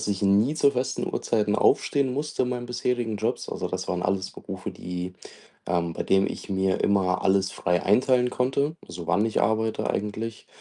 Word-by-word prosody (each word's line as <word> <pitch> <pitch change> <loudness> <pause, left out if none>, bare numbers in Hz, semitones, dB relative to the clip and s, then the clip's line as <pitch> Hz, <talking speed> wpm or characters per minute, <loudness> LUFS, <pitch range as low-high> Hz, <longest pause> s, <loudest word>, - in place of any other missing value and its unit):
dass - - -3
ich 100 -1 -1
nie 100 +8 +4
zu 140 -2 +4
festen 130 -1 -2
Uhrzeiten 105 -2 0
aufstehen 140 -3 +2
musste 145 +1 -2
in 125 - 0
meinen 120 -1 -3
bisherigen 120 -2 -1
Jobs. - - -2
Also, - - -3
das - - -4
waren 90 -1 -1
alles 95 +1 -1
Berufe, - - -7
die, 90 +1 -6 0.5
ähm 85 -1 0
bei - - -3
dem 95 0 +3
ich - - -6
mir 95 -1 +1
immer 95 -2 +2
alles 95 0 +2
frei 90 +1 0
einteilen 125 -1 +3
konnte, 140 +5 0
so 85 -1 -8
wann 90 +6 +2
ich 110 - 0
arbeite 110 0 +1
eigentlich 110 +2 -4
105 Hz, 185 wpm, -26 LUFS, 95-125 Hz, 0.5 s, nie